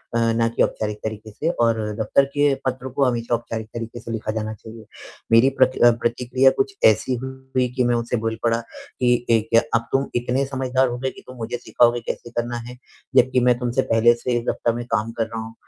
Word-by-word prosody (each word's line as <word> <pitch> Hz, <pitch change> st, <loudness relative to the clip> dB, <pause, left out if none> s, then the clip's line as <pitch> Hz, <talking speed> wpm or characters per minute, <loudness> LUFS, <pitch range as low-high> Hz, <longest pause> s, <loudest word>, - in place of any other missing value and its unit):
अ, -, -, +3 dB, 0.2 s
ना 115 Hz, 0 st, +2 dB
कि 115 Hz, -, -2 dB
औपचारिक 105 Hz, -1 st, -2 dB
तरीके 110 Hz, 0 st, -6 dB
से 155 Hz, +10 st, -2 dB
और 115 Hz, -7 st, +1 dB, 0.2 s
दफ़्तर 125 Hz, +6 st, +3 dB
के 145 Hz, -1 st, +3 dB
पत्र 130 Hz, 0 st, -3 dB
को 140 Hz, -, +2 dB
हमेशा 120 Hz, -2 st, -1 dB
औपचारिक 115 Hz, -1 st, -5 dB
तरीके 115 Hz, 0 st, -6 dB
से 115 Hz, -, -8 dB
लिखा 110 Hz, -1 st, -3 dB
जाना 110 Hz, 0 st, -3 dB
चाहिए। 110 Hz, +1 st, -12 dB, 0.5 s
मेरी 115 Hz, +4 st, +6 dB
प्रक 130 Hz, 0 st, +4 dB
अ, 120 Hz, -, +8 dB
प्रतिक्रिया 125 Hz, +3 st, +2 dB
कुछ 200 Hz, 0 st, 0 dB
ऐसी 110 Hz, +4 st, +3 dB
हुई 130 Hz, -1 st, -2 dB
कि 125 Hz, -, +2 dB
मैं 120 Hz, 0 st, +2 dB
उससे 120 Hz, +1 st, -1 dB
बोल 115 Hz, 0 st, -1 dB
पड़ा 115 Hz, -1 st, +2 dB, 0.4 s
कि 125 Hz, -1 st, +4 dB, 0.2 s
ए 115 Hz, -1 st, +5 dB, 0.2 s
अ, -, -, -1 dB
"अब 115 Hz, 0 st, +1 dB
तुम 135 Hz, +1 st, +1 dB
इतने 125 Hz, +3 st, 0 dB
समझदार 130 Hz, -1 st, 0 dB
हो 120 Hz, 0 st, -4 dB
गए 130 Hz, -, -1 dB
कि -, -, -14 dB
तुम 130 Hz, 0 st, -11 dB
मुझे 115 Hz, +1 st, -4 dB
सिखाओगे 120 Hz, 0 st, +2 dB
कैसे -, -, -5 dB
करना 120 Hz, +1 st, -2 dB
है? 125 Hz, -, -10 dB, 0.4 s
जबकि 130 Hz, +1 st, +4 dB
मैं 125 Hz, -1 st, +4 dB
तुमसे 125 Hz, +1 st, 0 dB
पहले 115 Hz, +1 st, +5 dB
से 120 Hz, +1 st, -1 dB
इस -, -, -8 dB
दफ्तर 115 Hz, -, 0 dB
में 120 Hz, 0 st, -5 dB
काम 110 Hz, +2 st, 0 dB
कर 115 Hz, -, +2 dB
रहा 115 Hz, 0 st, -6 dB
हूँ, 110 Hz, 0 st, -8 dB
120 Hz, 220 wpm, -22 LUFS, 115-130 Hz, 0.5 s, अ